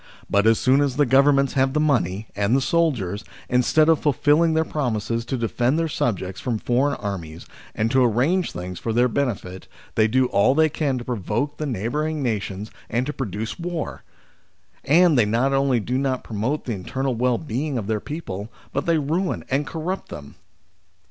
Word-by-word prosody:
But 100 +2 +2
as 115 -1 +5
soon 130 +2 +3
as 140 -3 0
the 145 +1 +3
Governments 140 +1 +4
have 135 0 +2
the 150 - +1
money 110 - +1
and 100 +4 +1
the - - +4
soldiers, 125 - 0 0.3
instead 125 +5 +3
of 165 -2 +4
fulfilling 150 +2 +3
their 160 0 +2
promises 115 -6 -2
to 130 +2 -2
defend 120 +4 0
their 165 0 +1
subjects 95 - -2
from 120 -4 -1
foreign 130 +6 0
enemies, 85 -5 -5 0.3
and 110 +1 0
to 130 -1 +4
arrange 135 - +1
things 90 0 -6
for 115 - -2
their 120 +2 +4
benefit, 115 -8 -3 0.3
they 110 -1 +3
do 130 +3 +2
all 100 +7 +3
they 160 +1 +4
can 140 -3 -1
to 120 - -5
provoke 120 +4 -2
th6 155 - -2
neighbouring 145 +8 -2
nations 105 -3 -3 0.2
and 120 +2 0
to 150 - -3
produce 110 - -4
war; 170 -2 -4 0.8
and 160 0 +5
"they 115 - +5
not 120 +6 +1
only 135 -2 +2
do 125 +4 -1
not 135 -2 -1
promote 115 +8 -2
the 120 - -2
internal 130 +7 -2
well 120 +1 +1
being 145 -1 -3
of 110 - -3
their 110 0 -1
people, 105 - -6 0.2
but 140 +4 -2
they 165 -1 +3
ruin 165 +6 -1
and 145 +2 +1
corrupt 170 +4 -4
them. 70 -1 -9
130 Hz, 185 wpm, -23 LUFS, 110-145 Hz, 0.8 s, as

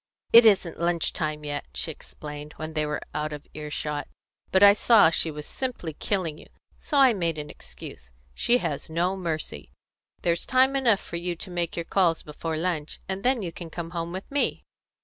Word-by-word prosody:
"It 230 0 +10
isn't 190 -5 +3
lunch 170 -1 +1
time 150 -1 -3
yet," 145 -1 -3
she 65 - -2
explained, 150 0 -9
when 155 0 -6
they 155 -1 0
were 150 - -3
out 155 0 -2
of 150 -1 -7
earshot, 150 -1 -4 0.4
"but 190 +1 +5
I 200 0 +10
saw 210 -5 +6
she 165 - +1
was 150 -1 -6
simply 245 -11 -4
killing 165 -2 -1
you, - - -14
and - - -32 0.2
so 300 - -2
I 265 -3 +7
made 170 -5 0
the 150 -1 -5
excuse. 60 0 -11 0.2
She 240 - +3
has 150 - -3
no 175 +4 0
mercy. 160 - -4 0.5
There's 170 0 +1
time 260 +1 +4
enough 235 -7 +3
for 170 - -6
you 175 0 -2
to 180 +3 -8
make 175 -1 -2
your 170 - -3
calls 175 -4 +2
before 155 +1 -4
lunch, 160 -3 -2
and 190 0 -3
then 245 -1 +2
you 170 - -3
can 170 0 -8
come 165 0 -6
home 170 -1 -3
with 185 +2 -5
me." 285 0 0
170 Hz, 200 wpm, -26 LUFS, 150-195 Hz, 0.5 s, It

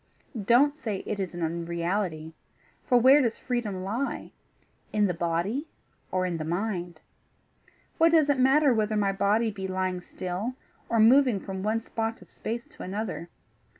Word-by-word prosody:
Don't 275 +6 +5
say 220 -10 -4
it 210 - -3
is 185 -2 -3
an 175 - -3
unreality 170 0 -2 0.5
for 250 - +5
where 265 +4 +7
does 235 -4 0
freedom 215 -7 -3
lie? 230 +8 -3 0.6
In 210 -1 +2
the 180 - +1
body 175 - -1 0.4
or 185 0 +1
in 175 -2 -2
the 155 - -4
mind? 175 -1 -3 1.0
What 330 0 +6
does 315 -3 +5
it 285 -2 +2
matter 270 +1 +5
whether 215 -1 0
my 200 -1 +2
body 210 +3 +1
be 195 -2 -5
lying 185 -1 -2
still 185 +8 -4 0.3
or 230 - +2
moving 245 -1 +5
from 190 0 -6
one 215 +3 0
spot 225 0 -3
of - - -22
space 235 +2 -5
to - - -14
another? 195 -3 -4
210 Hz, 160 wpm, -27 LUFS, 180-240 Hz, 1.0 s, where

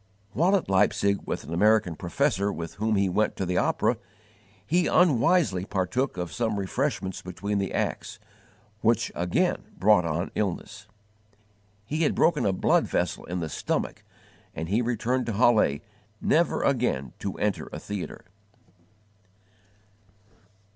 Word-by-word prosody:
While 175 - +3
at 190 - 0
Leipzig 100 +1 +2
with - - -3
an 80 - -7
American 105 -1 +3
professor 100 - 0
with 85 -4 -6
whom 110 +1 +1
he 100 -1 +2
went 105 +4 +1
to 95 - -2
the 90 0 +1
opera, - - +1 0.7
he 175 +2 +2
unwisely 145 - +3
partook 95 +5 -1
of 90 -2 -4
some 110 -3 -1
refreshments 95 -1 -2
between 100 +3 -3
the 95 -2 -2
acts, - - -3 0.6
which 115 0 +2
again 85 0 0 0.2
brought 100 0 +5
on 85 +2 -2
illness. 105 +2 -3 1.0
He 150 +8 -2
had 155 - +2
broken 150 -10 +3
a - - +3
blood 95 - +2
vessel - - -1
in 90 0 -4
the 80 - -2
stomach, - - -3 0.5
and 80 +1 -4
he 105 +5 +2
returned 125 +1 -1
to 115 - -1
Halle, 105 -9 +3 0.4
never - - +2
again 65 -1 0
to 100 - -4
enter 105 -1 -1
a - - -5
theatre. 100 -3 -6
100 Hz, 140 wpm, -26 LUFS, 90-115 Hz, 1.0 s, brought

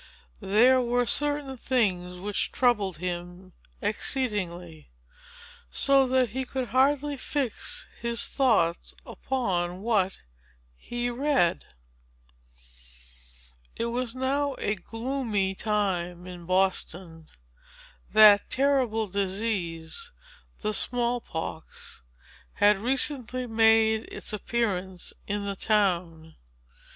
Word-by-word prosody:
There 245 +6 +4
were 245 0 +1
certain 290 -1 -1
things 190 -9 0
which 205 +2 -1
troubled 210 - +1
him 175 +1 -6 0.3
exceedingly, 200 - -2 0.8
so 275 - +5
that 255 -1 +2
he 260 +5 -3
could 260 -1 -4
hardly 280 +3 +2
fix 265 -3 -2
his 235 0 0
thoughts 215 -11 +1
upon 185 -8 -2
what 200 -4 0 0.5
he 240 - -4
read. 260 - +1 2.1
It 230 - -2
was 250 -1 -2
now 275 +2 0
a 205 - 0
gloomy 225 -1 -2
time 185 -4 -2
in 175 -2 -10
Boston. 180 -3 -1 0.8
That 210 -1 +7
terrible 255 -5 +1
disease, 195 - -3 0.5
the 215 0 -1
small 245 +1 +1
pox, 160 - -7 0.5
had 205 -1 +4
recently 255 +1 0
made 225 -1 +3
its - - -5
appearance 190 -5 -2
in 205 0 -2
the 200 0 -3
town. 175 -6 0
215 Hz, 95 wpm, -27 LUFS, 185-255 Hz, 2.1 s, That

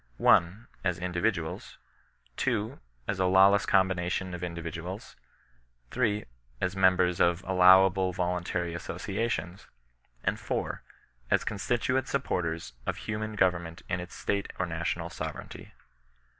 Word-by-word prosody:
1. 95 +7 +3 0.2
As 90 -3 0
individuals; 90 -1 -2 0.6
2. 110 -3 -1 0.3
As 100 - -2
a 95 - +3
lawless 95 +2 +5
combination 90 -1 +1
of 90 0 -6
indi 85 -1 -4
Tiduals; 85 +5 -6 0.8
3. 110 -4 0 0.3
As 90 +1 -1
members 90 -2 +3
of 85 +1 +3
allowable 95 0 +5
voluntary 90 -1 -2
associa 100 +6 -3
tions; 90 -1 -4 0.6
and - - 0
4. - - -3 0.5
As - - +3
constituent 125 +5 0
supporters 85 - -2
of - - -1
himian 110 0 -3
go 95 -3 +5
▼erament 85 -1 -8
in 90 -3 -1
its 90 +1 -8
State 100 -1 -2
or 95 - 0
National 85 0 -3
sovereignty. - - -7
90 Hz, 125 wpm, -29 LUFS, 85-100 Hz, 0.8 s, lawless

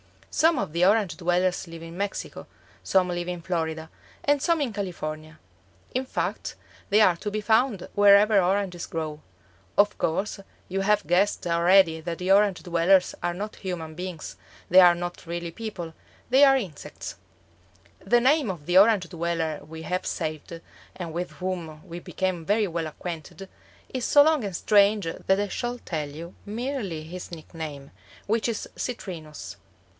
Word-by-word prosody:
Some 325 -1 +3
of 200 - -2
the 170 +2 +1
Orange 205 -2 +3
dwellers 180 +1 0
live 165 0 -9
in 165 0 -9
Mexico; 200 0 -4 0.4
some 185 -1 +2
live 175 0 -3
in 180 -1 -4
Florida, 160 -2 -3 0.3
and 290 -1 +2
some 335 -1 +2
in 255 -6 -1
California; 155 -6 -5 0.6
in 255 +1 -1
fact - - -3 0.3
they 210 +2 +5
are 180 -5 +5
to 210 - -4
be 215 +1 -3
found 220 -1 +2
wherever 205 0 +6
oranges 185 -1 -1
grow. 155 -2 -4 0.6
Of 205 0 +4
course, 195 +6 -1 0.3
you 195 +1 -1
have 210 0 +2
guessed 185 +4 +2
already 170 0 +4
that 170 0 -4
the 185 +1 -1
Orange 200 -1 +4
dwellers 180 +2 +3
are 175 0 -1
not 210 +4 -6
human 170 -4 -5
beings; 180 -1 -6 0.3
they 185 - +8
are 175 -1 +8
not 175 0 -6
really 170 0 -4
people; 180 -5 -6 0.4
they 270 +3 +7
are 270 -1 +6
insects. 185 - -7 0.8
The 240 +5 +3
name 275 -1 +3
of 170 -6 -5
the 180 +3 +6
Orange 200 -4 +4
dweller 165 -3 -2
we 160 +1 -9
had 180 +3 -2
saved, 155 +2 -4 0.3
and 170 -3 -6
with 175 +2 -3
whom 170 -4 -5
we 170 +1 -7
became 180 -2 -3
very 205 +3 +2
well 165 -2 -3
acquainted, 170 +4 -7 0.4
is 255 -2 -2
so 290 - +7
long 305 -6 +2
and 195 -3 -4
strange 205 +1 +4
that 190 +4 0
I 205 0 -1
shall 240 +4 -3
tell 155 -10 -4
you 165 +4 -9
merely 215 - -3
his 180 +3 -8
nickname, 155 -4 -8 0.3
which 225 +3 +1
is 230 -2 -3
Citrinus. 170 -11 -6
180 Hz, 160 wpm, -26 LUFS, 165-205 Hz, 0.8 s, they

